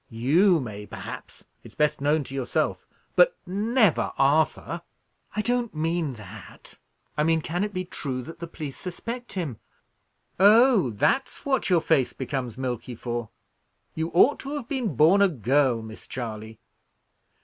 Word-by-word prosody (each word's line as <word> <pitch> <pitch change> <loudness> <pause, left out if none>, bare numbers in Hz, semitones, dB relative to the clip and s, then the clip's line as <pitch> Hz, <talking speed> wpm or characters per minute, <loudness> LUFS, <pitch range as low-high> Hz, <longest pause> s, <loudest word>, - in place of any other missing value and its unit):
You 160 - +3
may, 105 -5 -7
perhaps - - -9 0.2
it's - - -14
best 150 -2 +1
known 150 +2 +2
to 135 - -9
yourself 135 -2 -1 0.3
but - - +5
never 210 - +2
Arthur." 155 +4 +2 0.5
"I 215 - 0
don't 240 -4 -1
mean 160 -2 -1
that. 105 -2 -13 0.4
I 150 - +1
mean, 165 0 +2
can 175 +5 -2
it 210 - -2
be 185 -2 -3
true 130 -7 -5
that 165 - -10
the 170 - -5
police 150 -4 -7
suspect 230 +7 -6
him?" 155 - -4 0.8
"Oh! 215 - +6
that's 150 - 0
what 265 -6 +1
your 175 -3 +4
face 155 -6 +2
becomes 130 -3 -4
milky 125 -1 -4
for? 120 -1 -4 0.6
You 160 +1 -2
ought 260 +11 +5
to 280 +2 -5
have 275 -6 -5
been 245 - -2
born 165 - +5
a 200 - +6
girl, 130 - +1
Miss 110 0 -11
Charley. 110 -2 -6
155 Hz, 150 wpm, -26 LUFS, 125-200 Hz, 0.8 s, Oh